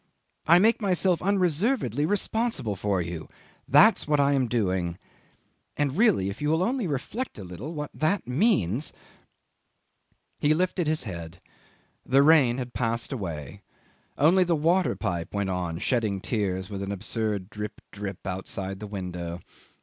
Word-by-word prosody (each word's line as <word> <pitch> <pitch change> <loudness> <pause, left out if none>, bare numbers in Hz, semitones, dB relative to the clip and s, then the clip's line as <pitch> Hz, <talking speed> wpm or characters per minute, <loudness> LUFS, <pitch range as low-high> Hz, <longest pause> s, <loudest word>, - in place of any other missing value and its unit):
I 170 +2 +8
make 225 +5 +4
myself 185 -3 +2
unreservedly 180 - +1
responsible 205 - -1
for 95 -1 0
you. 85 -2 -6 0.4
That's 150 - +5
what 150 -1 +2
I 140 0 +4
am 130 -3 +2
doing. 95 -7 -1 0.8
And 145 -2 0
really 200 - +3
if 100 - -10
you 150 - 0
will 160 +3 +2
only 240 -1 0
reflect 170 - -4
a 100 - -7
little 100 - -7
what 150 -1 -4
that 155 0 0
means.. 130 - +1 0.7
." - - -46
'He 150 +1 +3
lifted 180 -1 0
his 155 -3 0
head. 85 -4 -7 0.6
The 135 +2 +4
rain 140 -6 +5
had 125 -2 -5
passed 115 0 -1
away; 85 - -6 0.6
only 175 +6 +5
the 175 -2 +1
water 170 +5 +2
pipe 85 +2 -3
went 100 -2 -1
on 90 -3 -2
shedding 110 -1 0
tears 95 -3 -2
with 100 -1 -6
an 100 0 -3
absurd 100 0 -2
drip, 105 0 -6
drip 100 -2 -7
outside 95 0 -4
the 105 - -6
window. 90 -4 -5
125 Hz, 150 wpm, -26 LUFS, -, 0.8 s, I